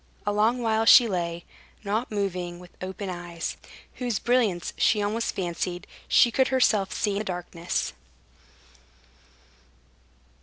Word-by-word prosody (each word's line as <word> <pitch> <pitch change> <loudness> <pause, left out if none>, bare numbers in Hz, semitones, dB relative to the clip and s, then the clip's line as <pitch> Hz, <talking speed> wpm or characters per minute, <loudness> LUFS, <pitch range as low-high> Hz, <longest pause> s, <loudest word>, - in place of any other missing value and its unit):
A 205 - +1
long 225 +4 +2
while 220 0 +1
she 235 +1 +8
lay, 170 -3 -3 0.4
not 215 +4 -1
moving, 185 -4 -3
with 180 0 -15
open 190 +2 -5
eyes, 175 -2 -5 0.4
whose 245 -5 -1
brilliance 225 -8 +1
she 215 - +3
almost 210 +3 -1
fancied 175 0 -3 0.2
she 240 - +5
could 260 +2 +3
herself 220 -7 +2
see 210 - -1
in 200 - -2
the - - -2
darkness. 175 - -3
200 Hz, 125 wpm, -26 LUFS, 175-225 Hz, 0.4 s, she